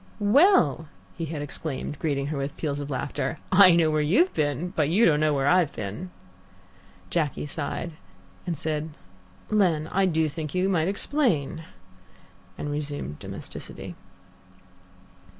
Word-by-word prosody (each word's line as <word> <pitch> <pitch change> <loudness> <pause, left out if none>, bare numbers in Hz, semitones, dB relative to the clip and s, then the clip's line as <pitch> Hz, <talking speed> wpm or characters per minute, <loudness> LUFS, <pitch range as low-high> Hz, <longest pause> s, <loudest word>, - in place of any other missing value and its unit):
"Well?" 220 - +5 0.3
he 165 - -3
had 150 -2 -4
exclaimed, 145 -1 -5
greeting 140 -3 -1
her - - -3
with 140 +1 -4
peals 145 -3 -2
of 145 0 -5
laughter. 135 0 -3
"I 185 -2 +8
know 165 -2 +3
where 155 0 +2
you've 215 - +3
been, 150 +3 -1
but 150 -4 0
you 205 +8 +4
don't 150 -2 +4
know 155 0 +3
where 135 -2 0
I've 175 -2 +4
been. 105 - -5 0.5
" 95 0 -28
Jacky 150 -4 -1
sighed, 150 +3 -4 0.6
said, 155 -1 -3 0.6
"Len, 175 -7 +2
I 195 0 +3
do 160 -2 +2
think 155 +2 -5
you 185 +1 +2
might 170 -4 +1
explain," 185 - 0 0.9
and 145 - -4
resumed 145 - -4
domesticity. - - -7
155 Hz, 140 wpm, -26 LUFS, 145-175 Hz, 0.9 s, I